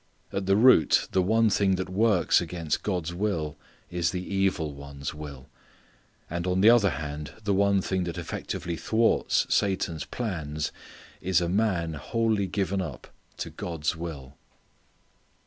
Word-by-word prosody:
At 100 Hz, -1 st, -2 dB
the 95 Hz, -, +4 dB
root 115 Hz, -5 st, +5 dB
the 95 Hz, -, +3 dB
one 110 Hz, +3 st, +3 dB
thing 95 Hz, -1 st, +3 dB
that 95 Hz, 0 st, -3 dB
works 95 Hz, -2 st, +3 dB
against 85 Hz, -2 st, -2 dB
God's 90 Hz, -4 st, -2 dB
will 85 Hz, -6 st, -1 dB, 0.4 s
is 85 Hz, -1 st, +1 dB
the 90 Hz, +3 st, -4 dB
evil 95 Hz, -6 st, +1 dB
one's 70 Hz, 0 st, -7 dB
will. 70 Hz, -3 st, -9 dB, 0.8 s
And 85 Hz, +2 st, -3 dB
on 90 Hz, +1 st, +1 dB
the 110 Hz, +3 st, +8 dB
other 115 Hz, -5 st, +5 dB
hand 75 Hz, -1 st, -5 dB
the 100 Hz, -1 st, +1 dB
one 100 Hz, 0 st, +3 dB
thing 95 Hz, -1 st, -1 dB
that 85 Hz, -1 st, -5 dB
effectively 85 Hz, 0 st, -4 dB
thwarts 115 Hz, +5 st, +2 dB
Satan's 95 Hz, -5 st, 0 dB
plans 80 Hz, -10 st, -3 dB, 0.5 s
is 95 Hz, -1 st, +2 dB
a 85 Hz, -, -1 dB
man 90 Hz, -4 st, +1 dB
wholly 110 Hz, +6 st, 0 dB
given 95 Hz, 0 st, -1 dB
up 70 Hz, -8 st, -7 dB, 0.2 s
to -, -, -5 dB
God's 80 Hz, -2 st, -3 dB
will. 75 Hz, -6 st, -7 dB
90 Hz, 145 wpm, -27 LUFS, 80-100 Hz, 0.8 s, the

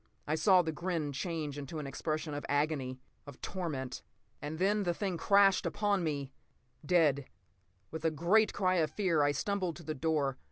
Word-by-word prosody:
I 150 Hz, -, -1 dB
saw 185 Hz, +2 st, +5 dB
the 160 Hz, -, -2 dB
grin 165 Hz, -2 st, -2 dB
change 145 Hz, 0 st, -3 dB
to 150 Hz, +4 st, -7 dB
an 150 Hz, -, -4 dB
expression 155 Hz, +2 st, -3 dB
of 145 Hz, -, -4 dB
agony, 145 Hz, -3 st, 0 dB, 0.3 s
of 145 Hz, -, -10 dB
torment. 150 Hz, -9 st, -4 dB, 0.4 s
And 150 Hz, +2 st, -5 dB
then 200 Hz, +4 st, +2 dB
the 175 Hz, -3 st, 0 dB
thing 195 Hz, -2 st, -2 dB
crashed 200 Hz, +3 st, +4 dB
upon 205 Hz, -3 st, 0 dB
me—dead. 140 Hz, 0 st, -1 dB, 0.7 s
With 160 Hz, 0 st, -6 dB
a 165 Hz, -, +3 dB
great 175 Hz, +8 st, +3 dB
cry 185 Hz, -2 st, +1 dB
of 155 Hz, -2 st, +2 dB
fear 180 Hz, -7 st, +1 dB
I 145 Hz, 0 st, +4 dB
stumbled 185 Hz, +1 st, -1 dB
to 170 Hz, -, -11 dB
the 155 Hz, -, -3 dB
door. 145 Hz, -3 st, 0 dB
160 Hz, 170 wpm, -32 LUFS, 145-185 Hz, 0.7 s, saw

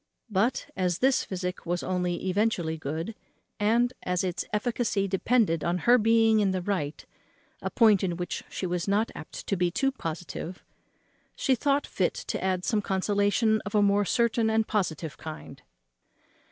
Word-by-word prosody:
But, 210 Hz, +6 st, +1 dB
as 180 Hz, -3 st, 0 dB
this 265 Hz, 0 st, +3 dB
physic 180 Hz, -1 st, -4 dB
was 175 Hz, +1 st, -2 dB
only 180 Hz, 0 st, -1 dB
eventually 185 Hz, -4 st, +1 dB
good, 160 Hz, +7 st, -4 dB, 0.5 s
and 235 Hz, +4 st, +2 dB
as 180 Hz, 0 st, -1 dB
its 180 Hz, -1 st, -2 dB
efficacy 210 Hz, -2 st, 0 dB
depended 190 Hz, -4 st, +2 dB
on 175 Hz, +1 st, +1 dB
her 245 Hz, +1 st, +6 dB
being 225 Hz, 0 st, +4 dB
in 200 Hz, -2 st, +3 dB
the 185 Hz, -1 st, -1 dB
right, 175 Hz, -7 st, -2 dB, 0.6 s
a -, -, -2 dB
point 215 Hz, -5 st, +4 dB
in 175 Hz, -3 st, -1 dB
which 175 Hz, 0 st, -4 dB
she -, -, -4 dB
was 175 Hz, 0 st, -2 dB
not 205 Hz, +3 st, +1 dB
apt -, -, -9 dB
to 200 Hz, -, 0 dB
be 180 Hz, -1 st, +1 dB
too 270 Hz, +10 st, +1 dB
positive, 175 Hz, -4 st, -6 dB, 0.7 s
she 265 Hz, -, +2 dB
thought 280 Hz, +3 st, +1 dB
fit -, -, -1 dB
to -, -, -4 dB
add 185 Hz, -1 st, 0 dB
some 215 Hz, -3 st, +1 dB
consolation 205 Hz, +3 st, +1 dB
of 205 Hz, -, -5 dB
a 205 Hz, -, +5 dB
more 200 Hz, 0 st, +3 dB
certain 230 Hz, +2 st, +2 dB
and 220 Hz, 0 st, +1 dB
positive 165 Hz, -7 st, -2 dB
kind. 155 Hz, -1 st, -9 dB
200 Hz, 165 wpm, -27 LUFS, 180-225 Hz, 0.7 s, her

